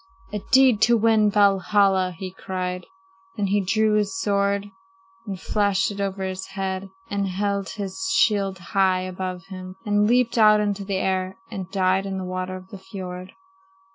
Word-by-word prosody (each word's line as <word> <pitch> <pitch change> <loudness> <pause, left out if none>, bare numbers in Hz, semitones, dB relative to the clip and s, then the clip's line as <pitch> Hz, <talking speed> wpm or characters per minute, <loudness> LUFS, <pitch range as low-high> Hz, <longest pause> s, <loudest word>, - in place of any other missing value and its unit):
"'A 210 - -1
deed 260 -5 +5
to 240 +1 +5
win 220 -1 +4
Valhalla!' 195 -2 +3
he 185 0 -6
cried. 180 -1 -4 0.5
"Then 205 - 0
he 200 +1 +2
drew 215 +3 +2
his 200 -2 0
sword 200 0 0 0.6
and 195 -2 -5
flashed 200 -1 +1
it 200 0 -5
over 195 -1 -2
his 190 0 -4
head 195 0 -4 0.2
and 200 -1 0
held 200 +1 -1
his 190 -2 -5
shield 195 0 +2 0.2
high 190 -2 +3
above 185 -1 -5
him, 185 -1 -8
and 205 0 +2
leaped 235 0 +2
out 215 -1 +7
into 205 -1 -1
the 195 -1 -2
air 190 0 -1
and 190 -2 -5
died 190 0 +1
in 190 -1 -3
the 190 - -4
water 185 0 -4
of 185 0 -11
the 200 - -9
fiord." 185 -1 -8
195 Hz, 170 wpm, -23 LUFS, 185-205 Hz, 0.6 s, out